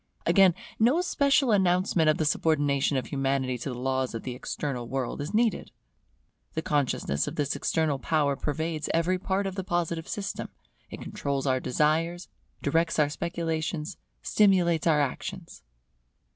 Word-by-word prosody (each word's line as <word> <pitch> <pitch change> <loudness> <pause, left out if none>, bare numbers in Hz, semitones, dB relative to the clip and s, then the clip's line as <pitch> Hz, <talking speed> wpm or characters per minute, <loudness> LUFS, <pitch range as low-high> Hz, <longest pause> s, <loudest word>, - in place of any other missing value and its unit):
Again, 190 -4 +5 0.2
no 250 +10 +4
special 280 -7 +2
announcement 180 -4 +3
of 155 - +3
the 155 - 0
subordination 145 -2 +1
of 130 - -2
Humanity 135 -2 -1
to 120 - -4
the 125 - -5
laws 130 -1 -1
of 115 - -5
the 125 - -4
External 125 -1 -4
World 135 +1 -3
is 145 +5 -4
needed. 220 0 +1 0.9
The 160 - -2
consciousness 140 - 0
of - - -4
this 145 -2 -1
external 155 -4 0
power 145 -1 +1
pervades 155 +2 -3
every 180 +3 +1
part 195 +2 -1
of 195 - -2
the 190 0 -4
Positive 170 -2 -2
system; 205 -1 -4 0.4
it - - -8
controls 140 -1 -3
our 130 -1 +2
desires, 160 +7 0 0.3
directs 165 +3 +1
our 150 -2 +3
speculations, 165 -1 -3 0.3
stimulates 180 -6 +3
our 155 -2 +4
actions. 140 - -4
160 Hz, 150 wpm, -27 LUFS, 140-180 Hz, 0.9 s, Again